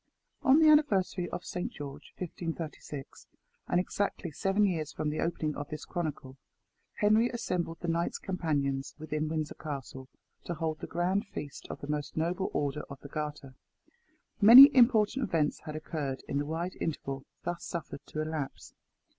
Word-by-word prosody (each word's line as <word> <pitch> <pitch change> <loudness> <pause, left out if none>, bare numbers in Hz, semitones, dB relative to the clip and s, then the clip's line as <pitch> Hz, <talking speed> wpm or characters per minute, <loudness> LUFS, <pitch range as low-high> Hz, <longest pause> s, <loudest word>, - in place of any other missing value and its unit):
ON 270 +1 +6
the 320 - +6
anniversary 195 - +3
of 175 - -6
Saint 180 - -3
George, 140 -2 -9
1536, 165 -5 -6 0.4
and 175 - +2
exactly 185 -2 -2
seven 195 +7 +2
years 160 -6 -1
from 150 -1 -2
the 155 - -3
opening 160 -2 -1
of 145 -1 -6
this 155 0 -6
chronicle, 145 -6 -4 0.6
Henry 215 +3 +4
assembled 180 -9 -2
the 175 - -3
knights 170 +1 0
companions 145 -7 -2
within 155 0 -3
Windsor 155 -2 -2
Castle 135 -3 -7 0.4
to 175 - -3
hold 160 -1 -2
the - - -6
grand 185 +5 0
feast 145 - -7
of - - -7
the 145 - -6
most 150 0 -3
noble 175 +4 0
Order 145 +1 -1
of 140 - -9
the 140 - -10
Garter. 150 -3 -5 0.9
Many 255 +8 +12
important 235 0 +5
events 155 -3 +1
had 155 - -5
occurred 150 -4 -4
in 140 - -1
the 145 - -2
wide 170 +4 -3
interval 135 -4 -3 0.2
thus 175 0 -3
suffered 170 -4 -5
to 155 - -3
elapse. 155 -3 -5
160 Hz, 160 wpm, -30 LUFS, 150-185 Hz, 0.9 s, Many